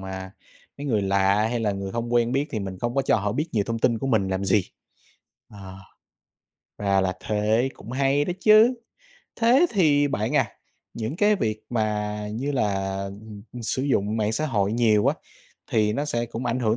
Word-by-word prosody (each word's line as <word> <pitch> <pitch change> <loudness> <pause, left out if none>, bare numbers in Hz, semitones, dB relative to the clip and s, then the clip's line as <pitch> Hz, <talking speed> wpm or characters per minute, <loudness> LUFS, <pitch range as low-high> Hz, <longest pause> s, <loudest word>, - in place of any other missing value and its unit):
mà 95 0 -7 0.5
mấy 145 - -6
người 110 -6 +1
lạ 100 +2 +2
hay 120 -1 -1
là 105 -2 0
người 100 0 -5
hông 120 +1 -3
quen 120 0 +2
biết 140 +2 0
thì 110 - -2
mình 95 -2 -6
không 120 +4 -2
có 135 - +2
cho - - +2
họ 105 -1 -1
biết 150 +7 -1
nhiều 105 -3 +1
thông 115 0 -2
tin 115 0 +2
của 135 - -3
mình 110 -7 +1
làm 95 +1 -2
gì. 95 0 +2 0.9
Ờ. 95 -2 -10 1.0
Ra 100 -1 +1
là 95 -1 0
thế, 110 +4 0
cũng 115 - -11
hay 135 +2 +1
đó 180 - -2
chứ! 215 +5 +6 0.7
Thế 250 +9 +5
thì 145 -8 +3
bạn 120 +3 -1
à, - - +3 0.5
những 115 +7 -4
cái 210 +1 +3
việc 110 - -2
mà 105 -2 -1 0.2
như 135 +6 -2
là, 95 -6 -1
ừm, 100 +1 -9 0.2
sử 130 - -1
dụng 110 -6 0
mạng 110 0 0
xã 155 +7 -1
hội 105 -6 0
nhiều 110 -3 +3
á, - - +3 0.6
thì 105 -1 +2
nó 145 +6 -1
sẽ 120 -5 -2
cũng 120 +2 -5
ảnh 125 +2 -1
hưởng 110 -1 +1
110 Hz, 200 wpm, -24 LUFS, 100-135 Hz, 1.0 s, chứ